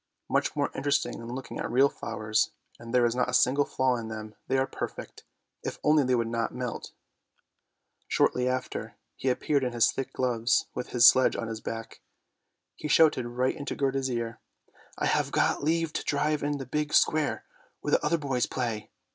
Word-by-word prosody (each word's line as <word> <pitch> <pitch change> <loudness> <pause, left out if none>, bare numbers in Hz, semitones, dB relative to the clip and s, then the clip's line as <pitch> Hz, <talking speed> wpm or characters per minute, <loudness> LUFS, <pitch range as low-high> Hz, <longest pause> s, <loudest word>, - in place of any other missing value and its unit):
" - - -55
Much - - +1
more - - 0
interesting 140 +1 0
than 115 +1 -7
looking 135 - -7
at - - -3
real 130 +4 +5
flowers, 110 -4 -1 0.3
and 115 0 -9
there 125 -1 +4
is 115 - +1
not 125 - +1
a - - +1
single 140 +3 +4
flaw 130 -1 +1
in 115 -1 -5
them, 110 -1 -7
they 135 - +1
are 130 - +2
perfect, - - -7 0.4
if - - -5
only 150 -1 +4
they 130 -1 +2
would 115 -1 0
not 115 0 -1
melt." 125 -2 -5 1.1
Shortly 125 0 +2
after, 130 0 -4 0.2
he 135 - -1
appeared 140 +2 +1
in 125 -1 -1
his 120 -1 +4
thick 135 - -4
gloves, 120 -2 +1
with 125 - -5
his 120 -1 +7
sledge 130 +1 +5
on 115 - -3
his 110 0 -5
back. 115 0 -6 0.7
He 150 - -5
shouted 150 -6 +4
right 125 +2 0
into 145 - -5
Gerda's 135 -1 0
ear, 115 -2 -3 0.3
" - - -27
I - - -1
have - - +1
got - - +1
leave 165 +1 +1
to - - -2
drive 150 +1 0
in 145 0 -1
the 135 - -6
big 150 +4 -1
square 155 -1 +2 0.4
where - - -3
the - - +3
other 165 +3 +2
boys 135 -5 -1
play! 110 -4 -3
130 Hz, 195 wpm, -28 LUFS, 115-140 Hz, 1.1 s, his